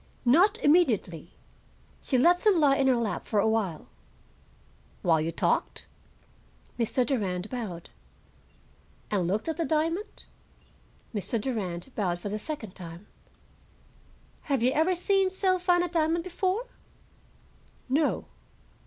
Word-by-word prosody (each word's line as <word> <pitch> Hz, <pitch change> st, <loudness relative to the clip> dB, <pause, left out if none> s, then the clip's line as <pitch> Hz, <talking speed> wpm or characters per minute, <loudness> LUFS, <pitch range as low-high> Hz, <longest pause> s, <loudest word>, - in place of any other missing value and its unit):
"Not 365 Hz, -, +5 dB
immediately. 220 Hz, -, +2 dB, 0.7 s
She 260 Hz, -, 0 dB
let 350 Hz, +8 st, +4 dB
them 410 Hz, -5 st, +4 dB
lie 285 Hz, -3 st, +4 dB
in 275 Hz, -1 st, +2 dB
her 260 Hz, -, +4 dB
lap 230 Hz, -3 st, -2 dB
for 210 Hz, -, +1 dB
a 200 Hz, -, +3 dB
while." 210 Hz, -8 st, -1 dB, 1.2 s
"While 165 Hz, -3 st, +3 dB
you 165 Hz, +2 st, -2 dB
talked?" -, -, 0 dB, 0.9 s
Mr. 240 Hz, +2 st, +1 dB
Durand 200 Hz, -7 st, -2 dB
bowed. 205 Hz, -9 st, -6 dB, 1.2 s
"And 190 Hz, -5 st, +1 dB
looked 205 Hz, -, -1 dB
at 320 Hz, -2 st, -2 dB
the 335 Hz, -, 0 dB
diamond?" 330 Hz, +5 st, -2 dB, 0.9 s
Mr. 215 Hz, +2 st, -1 dB
Durand 205 Hz, -4 st, -4 dB
bowed 180 Hz, -5 st, -1 dB
for 205 Hz, -, -5 dB
the 210 Hz, +1 st, -3 dB
second 220 Hz, -7 st, -6 dB
time. 170 Hz, +1 st, -10 dB, 1.4 s
"Had 270 Hz, -5 st, +1 dB
you 255 Hz, -, +4 dB
ever 320 Hz, +6 st, +2 dB
seen 385 Hz, +2 st, +2 dB
so 375 Hz, -1 st, +1 dB
fine 355 Hz, -1 st, +3 dB
a -, -, -1 dB
diamond 330 Hz, 0 st, 0 dB
before?" 370 Hz, +5 st, -1 dB, 1.2 s
"No." 290 Hz, +4 st, +1 dB
260 Hz, 125 wpm, -28 LUFS, 205-340 Hz, 1.4 s, Not